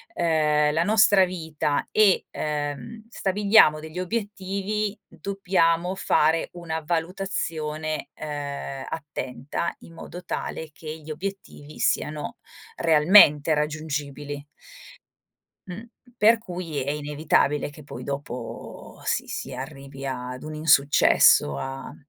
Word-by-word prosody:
ehm, 150 -3 +2
la 165 +2 +2
nostra 205 -1 +5
vita 160 -5 -2
e, 210 -3 +4
ehm, 150 - -4
stabiliamo 200 -6 +4
degli 160 +3 -7
obiettivi, 205 +1 -3
dobbiamo 180 -3 0
fare 160 -3 +2
una 165 -2 -4
valutazione, 160 -3 -3
ehm, 140 -2 -5
attenta 145 0 -4
in 165 - -15
modo 175 +2 -9
tale 160 -2 -4
che 155 0 -7
gli 155 0 -13
obiettivi 155 -3 -7
siano 150 +9 -1 0.4
realmente 155 - +6
raggiungibili. 150 -1 -3 1.2
Mh, 185 +4 -7 0.3
per 225 +1 +6
cui 180 -7 -6
è 135 +2 -1
inevitabile 150 0 +1
che 145 +1 -13
poi 125 -3 -8
dopo 140 -3 -7
si - - -1
si 135 - -5
arrivi 135 +1 -8
ad 125 -1 -5
un 155 - -6
insuccesso, 140 - +5
a 135 - -6
155 Hz, 105 wpm, -25 LUFS, 145-185 Hz, 1.2 s, realmente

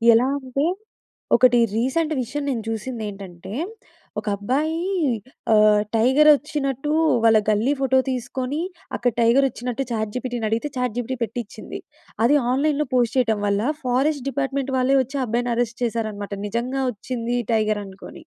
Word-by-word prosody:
ఎలా 240 +3 +3
అంటే, 270 +2 -2 0.7
ఒకటి 250 -1 +5 0.2
రీసెంట్ 305 +7 0
విషయం 290 +5 -4
నేను 235 -4 -1
చూసిందేంటంటే, 205 -5 -6 0.7
ఒక - - -10
అబ్బాయి 285 +10 0 0.8
ఆహ్, 210 -1 +5
టైగర్ 265 +7 +5
వోచ్చినట్టు 290 -1 -2 0.3
వాళ్ళ 225 -1 +6
గల్లీ 220 +7 +2
ఫోటో 265 0 +3
తీసుకొని, 255 +4 -3 0.3
అక్కడ 245 0 +1
టైగర్ 240 +4 +5
వచ్చినట్టు 250 +2 -4
చాట్ 220 -2 -2
జిపిటి‌ని 245 -3 -2
అడిగితే, 230 +7 -1
చాట్ 250 -3 -1
జిపిటి 245 +1 -2
పేట్టిచింది. 230 0 -6 0.5
అది 290 +5 +5 0.2
ఆన్‌లైన్‌లో 295 +1 +1
పోస్ట్ 240 -1 +2
చేయటం 220 -4 +2
వల్ల, 200 +2 +1 0.2
ఫారెస్ట్ 265 +2 +1
డిపార్ట్మెంట్ 275 0 -2
వాళ్ళే 260 +2 +3
వచ్చి, 270 +3 -5
ఆ - - -1
అబ్బాయిని 240 +2 0
అరెస్ట్ 235 0 -2
చేశారనమాట. 215 -3 -3
నిజంగా, 245 +5 -2
వోచ్చింది 240 +1 -3 0.2
టైగర్ 215 -1 +1
అనుకోని. 190 0 -11
245 Hz, 135 wpm, -23 LUFS, 220-270 Hz, 0.8 s, వాళ్ళ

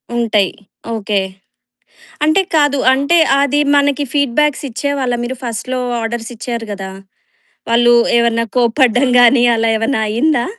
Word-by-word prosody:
ఉంటాయి. 220 -5 +1 0.4
ఓకే. 210 -2 -1 1.0
అంటే 310 +6 +3
కాదు 290 -2 +2 0.2
అంటే 280 +6 +1 0.2
అది 285 +1 +1 0.2
మనకి 285 0 +1
ఫీడ్‌బ్యాక్స్ 290 +1 0
ఇచ్చేవాళ్ళా 260 0 -2
మీరు 255 +2 -4
ఫస్ట్‌లో 245 +2 -4 0.2
ఆర్డర్స్ 225 +1 -5
ఇచ్చారు 235 0 -5
కదా! 195 -1 -6 0.8
వాళ్ళు 240 +1 +4 0.2
ఏమన్నా 230 0 +1
కోప్పడడం 245 +1 +2
గానీ 245 +1 +5
అలా 225 0 0
ఏమన్నా 225 +2 -1
అయిందా? 240 +3 0
245 Hz, 120 wpm, -15 LUFS, 230-280 Hz, 1.0 s, గానీ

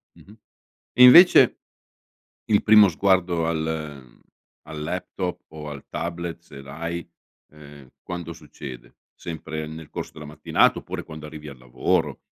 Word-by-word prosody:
Mh-mh. 105 +3 -18 0.6
E 125 - +6
invece 175 +9 +8 0.9
il 105 -4 +2
primo 105 -2 +7
sguardo 90 -1 +1
al 80 -5 -5 0.4
al 75 -1 -8
laptop 90 +2 -4
o 75 -1 -9
al 70 -2 -9
tablet 85 0 -5
se 70 - -13
l'hai, 85 +5 -6 0.5
ehm, 70 -3 -15
quando 85 -2 -7
succede? 70 -6 -11 0.2
Sempre 80 -2 -7
nel 80 -1 -10
corso - - -7
della 75 - -10
mattinata 75 +1 +1
oppure - - -7
quando 80 -1 -10
arrivi 75 -1 -10
al 70 - -12
lavoro, 60 0 -2
80 Hz, 130 wpm, -23 LUFS, 75-85 Hz, 0.9 s, invece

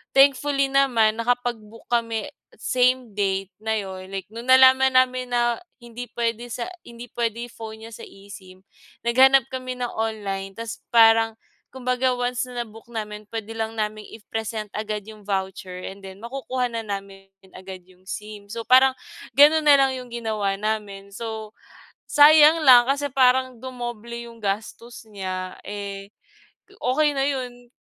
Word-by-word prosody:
thankfully 275 0 +4
naman, 230 -5 +3
nakapag-book 230 -2 -2
kami 230 -2 -1 0.2
same 250 +1 +1
date 195 -1 -1
na 220 0 -1
'yon 190 -3 -5
like 195 -1 -4
no'ng 230 +2 -8
nalaman 260 0 +6
namin 255 0 +3
na 240 -1 +1 0.2
hindi 240 +1 -8
pwede 235 0 -2
sa 240 0 -4 0.2
hindi 235 0 -11
pwede 235 0 -3
phone 220 -1 -9
niya 230 - -11
sa - - -11
eSIM, 195 -2 -14 0.4
naghanap 260 +2 +5
kami 255 -1 -5
ng 245 -1 -4
online 200 -3 -4
tapos 230 +1 -6
parang 225 -1 +5 0.4
kumbaga 255 0 0
once 245 +1 -2
na-book 235 -2 -7
namin 210 -2 -6
pwede 225 0 -5
lang 225 0 -4
naming 215 -1 -3
i-present 220 -1 -5
agad 215 -1 -4
yung 215 -2 -13
voucher 190 -2 -4
and 195 - -13
then 190 0 -10
makukuha 250 0 -3
na 230 -1 -3
namin 195 -1 -6 0.2
agad 185 0 -10
yung 185 0 -24
SIM. 210 0 -7
So 230 +2 -5
parang 260 +2 +5 0.4
gano'n 300 +2 +6
na 290 - +9
lang 270 -1 +3
'yong 250 - -10
ginawa 215 -4 -2
namin. 200 -1 -4
So, 220 -1 -6 0.6
sayang 305 +2 +7
lang 250 -3 +8
kasi 285 +1 0
parang 255 -1 +2
dumoble 240 -2 -7
'yong 235 -1 -9
gastos 220 +3 -4
niya 185 -2 -5
eh, 200 0 -7 0.7
okey 295 +4 +2
na 270 0 0
'yon. 245 -3 -4
230 Hz, 145 wpm, -23 LUFS, 210-255 Hz, 0.7 s, na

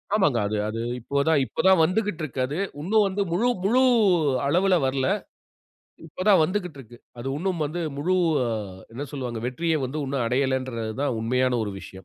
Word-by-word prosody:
ஆமாங்க. 170 - +3
அது 105 +1 -2
அது 115 +1 -4 0.2
இப்போ 140 +4 -1
தான் 160 -3 +4
இப்போ - - -11
தான் 190 -3 +6
வந்துக்கிட்டு 185 0 0
இருக்கு 135 -3 -5
அது. 145 +5 -4 0.2
இன்னும் 210 +5 +3
வந்து 195 +1 -2
முழு 210 +8 +1 0.2
முழு 250 +5 +4 0.7
அளவுல 185 +5 +3
வரல. 130 0 0 1.0
இப்ப 175 +3 -6
தான் 190 -5 +6
வந்துக்கிட்டு 180 -4 -2
இருக்கு. 120 -1 -13 0.2
அது 130 - -5
இன்னும் 180 -1 -2
வந்து 170 +4 -4 0.2
முழு 180 +6 +1 0.8
என்ன 135 +4 -5
சொல்வாங்க, 125 -5 -4
வெற்றிய 165 +6 -1
வந்து 135 +5 -5
இன்னும் 135 -3 -1
அடையலன்றதான் 130 -1 -1
உண்மையான 125 +1 +1
ஒரு 105 - -4
விஷயம். - - -11
145 Hz, 165 wpm, -25 LUFS, 125-185 Hz, 1.0 s, தான்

